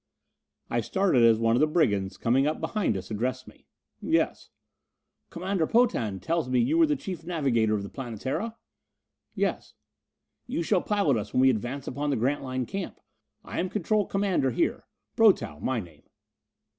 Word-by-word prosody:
I - - 0
started 190 -10 +2
as 115 -1 +6
one 115 0 +2
of - - +2
the 155 - +4
brigands, 100 - +1
coming 130 +4 +2
up 155 - -1
behind 200 - -1
us, 95 +3 -8
addressed 125 +4 -2
me. - - -17 0.3
"Yes." - - 0 0.8
"Commander 180 -1 -1
Potan 120 - +2
tells 160 - -1
me 130 - +2
you 305 +8 +2
were 325 - +6
chief 190 - -6
navigator 135 -11 +1
of 100 - -3
the 100 - -7
Planetara?" 135 - -4 0.8
"Yes." - - -2 0.7
"You 240 -9 -2
shall 185 +1 +2
pilot 200 - +1
us 105 - -5
when 130 - +4
we 130 0 +6
advance 125 +4 -4
upon 145 +3 -2
the 140 - +1
Grantline 130 +1 -1
camp. 195 - -5 0.4
I - - -5
am 185 - -1
control 210 +1 0
commander 195 -9 +1
here 115 - -1 0.3
Brotow, 75 - +3
my 130 -2 0
name." 85 -7 -11
135 Hz, 160 wpm, -27 LUFS, 115-185 Hz, 0.8 s, as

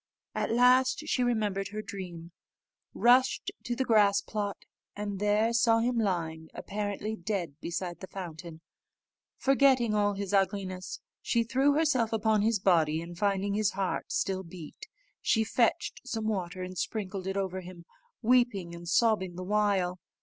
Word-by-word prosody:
At - - -1
last 250 +4 +4
she 275 - 0
remembered 210 -5 0
her 215 +1 -6
dream, 180 -5 -8 0.6
rushed 250 +2 +3
to 240 - -1
the 265 +2 -1
grass 205 -4 +4
plot, 205 -2 -4 0.3
and 205 -1 -4
there 210 +3 +2
saw 230 -1 +4
him 235 +1 +1
lying 165 -6 -2
apparently 205 +1 -3
dead 175 -6 -4
beside 175 0 -4
the 190 - -8
fountain. 170 -3 -8 0.8
Forgetting 265 -4 +3
all 205 -1 +2
his 200 0 -4
ugliness, 190 -2 -1 0.2
she 235 - +1
threw 265 +5 +2
herself 280 -7 +2
upon 220 -1 +2
his 220 +1 +2
body, 165 -5 +3
and, 170 +1 -8
finding 200 +1 0
his 210 0 +1
heart 190 -1 -2
still 190 -1 0
beat, 180 - -10 0.3
she 225 - +2
fetched 230 +2 0
some 225 -4 -4
water 185 -4 -2
and 185 0 -6
sprinkled 195 -3 -3
it 190 +1 -2
over 190 -1 -2
him, 175 -1 -11 0.4
weeping 225 -7 +2
and 170 0 -8
sobbing 190 -3 +2
the 185 - -5
while. 195 -3 +1
205 Hz, 150 wpm, -29 LUFS, 185-225 Hz, 0.8 s, last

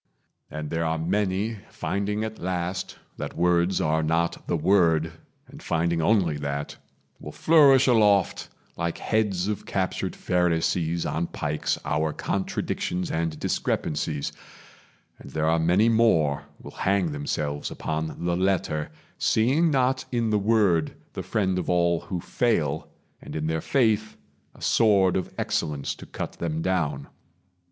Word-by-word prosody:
And 75 -1 -6
there 80 0 0
are 80 0 0
many, 100 +5 -1
Finding 105 +2 -2
at 110 0 -5
last 90 +1 -3 0.2
that - - -6
words 90 +1 +2
are 80 +1 +1
not 80 +2 -1
the - - +1
Word, 85 -5 +3 0.3
And - - -13
finding 85 0 0
only 85 -4 +2
that, 70 0 -4 0.4
will - - -8
flourish 140 -5 +5
aloft, 105 -6 +3 0.3
Like 85 0 -2
heads 100 -4 0
of 105 -1 -3
captured 95 -2 -2
Pharisees 85 -1 0
on 85 +2 -1
pikes, 75 0 -2
Our 75 +1 0
contradictions 90 -2 -2
and 80 -1 -2
discrepancies; 75 -1 -1 0.9
And - - -11
there 80 +3 -1
are 80 +1 +3
many 90 +7 +3
more 110 -11 +3
will - - -10
hang 95 -4 +2
themselves 75 0 -3
Upon 80 +2 -4
the 85 0 +1
letter, 90 -5 0 0.3
seeing 135 +10 +3
not 130 -2 +1
in 115 -3 0
the 105 - +3
Word 100 -7 +2 0.2
The - - -4
friend 95 -3 0
of - - -4
all 85 -1 +2
who 90 +1 -5
fail, 80 - 0 0.3
and - - -9
in 80 0 -2
their 80 0 -1
faith 110 -5 +1 0.4
A - - -13
sword 100 -5 +4
of 95 - -2
excellence 75 -3 -1
to - - -12
cut - - -6
them 80 -1 -2
down. 75 -7 -1
85 Hz, 140 wpm, -25 LUFS, 80-105 Hz, 0.9 s, flourish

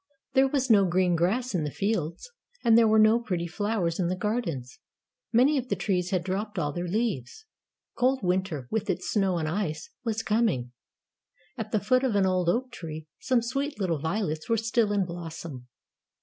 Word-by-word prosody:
There 265 +1 +5
was 265 -2 +1
no 205 -3 +7
green 180 0 +2
grass 220 +10 0
in 175 -4 0
the 150 - -1
fields, 195 - -2 0.3
and 230 -1 +5
there 230 -1 +6
were 220 0 +4
no 215 +2 +6
pretty 180 -8 -2
flowers 195 -2 -1
in 175 - +1
the 180 - 0
gardens. 180 - -3 0.5
Many 265 +5 +4
of 255 0 -7
the - - +1
trees 180 -3 -1
had 185 -3 0
dropped 200 +4 -3
all 145 - 0
their 175 +2 -3
leaves. 215 - -2 0.5
Cold 260 -1 +1
winter, 180 -7 -1
with 215 -2 -1
its 180 -1 -1
snow 195 -4 +2
and 160 -2 -1
ice, 155 -3 -3
was 225 -2 -1
coming. 210 - +1 0.8
At 220 -1 -5
the 215 - +2
foot 255 +6 +2
of 250 -5 +1
an 200 -1 +4
old 185 -2 +1
oak 250 +7 0
tree, 160 -2 -7
some 255 -3 +1
sweet 275 +1 -2
little 175 -6 0
violets 160 -1 -2
were 230 - +3
still 225 -1 +1
in 200 -2 +1
blossom. 165 -6 -7
195 Hz, 190 wpm, -27 LUFS, 170-230 Hz, 0.8 s, no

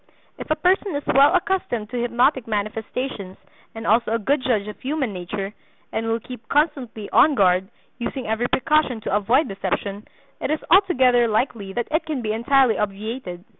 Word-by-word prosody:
If - - -8
a 310 - +3
person 365 +3 +1
is 285 - -3
well 275 +2 +5
accustomed 290 - -1
to 245 -1 -2
hypnotic 245 +2 +1
manifestations, 215 -1 -4 0.4
and 225 0 -7
also 230 +2 +3
a 225 - +1
good 265 +6 0
judge 220 -6 0
of 210 - -8
human 270 -5 -2
nature, 195 +3 -5 0.4
and 225 +1 -2
will 225 0 0
keep 235 -1 -11
constantly 275 -8 0
on 300 -2 +5
guard, 185 -3 +3 0.3
using 250 +1 -4
every 220 +3 0
precaution 270 -3 +1
to 205 - -1
avoid 235 +9 +2
deception, 195 +1 -4 0.3
it - - -2
is 310 - +1
altogether 260 - +5
likely 215 -3 -1
that 240 +2 -2
it 315 +1 0
can 290 -6 -3
be 215 -1 -1
entirely 240 +1 +3
obviated. 210 -2 -4
235 Hz, 170 wpm, -22 LUFS, 210-275 Hz, 0.4 s, well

